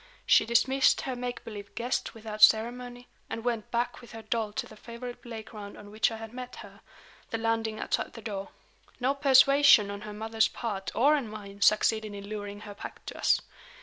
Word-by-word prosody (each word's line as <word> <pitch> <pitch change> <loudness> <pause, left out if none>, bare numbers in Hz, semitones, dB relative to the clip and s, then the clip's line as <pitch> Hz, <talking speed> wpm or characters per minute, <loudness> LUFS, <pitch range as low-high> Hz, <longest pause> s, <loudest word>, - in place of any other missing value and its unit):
She 215 - +5
dismissed 265 +3 +3
her 260 -2 -3
make 245 0 -5
believe 205 -3 -9
guests 245 +1 -2
without 215 -1 -7
ceremony, 245 +3 +4 0.2
and 225 - -5
went 235 -3 -2
back 240 +1 -2
with 240 - -14
her 225 0 -8
doll 225 -2 -1
to 260 +2 -3
the 220 - -13
favorite 235 +3 -8
play 230 -2 -7
ground 210 -2 -10
on 205 0 -12
which 215 +1 +2
I 225 - -6
had 225 0 -9
met 250 0 -7
her - - -16 0.5
the 225 - -2
landing 225 -1 -1
outside - - -2
the 230 - -9
door. 200 -3 -5 0.5
No 260 +2 +2
persuasion 275 -5 +6
on 200 0 -6
her 210 0 -7
mother's 220 +1 +1
part 205 -5 -4
or 285 +6 +5
on 275 -6 -2
mine 200 -2 -10
succeeded 215 0 +3
in 200 0 -8
luring 205 -1 -6
her 210 -1 -8
back 200 - -10
to - - -7
us. - - +3
225 Hz, 200 wpm, -29 LUFS, 210-245 Hz, 0.5 s, persuasion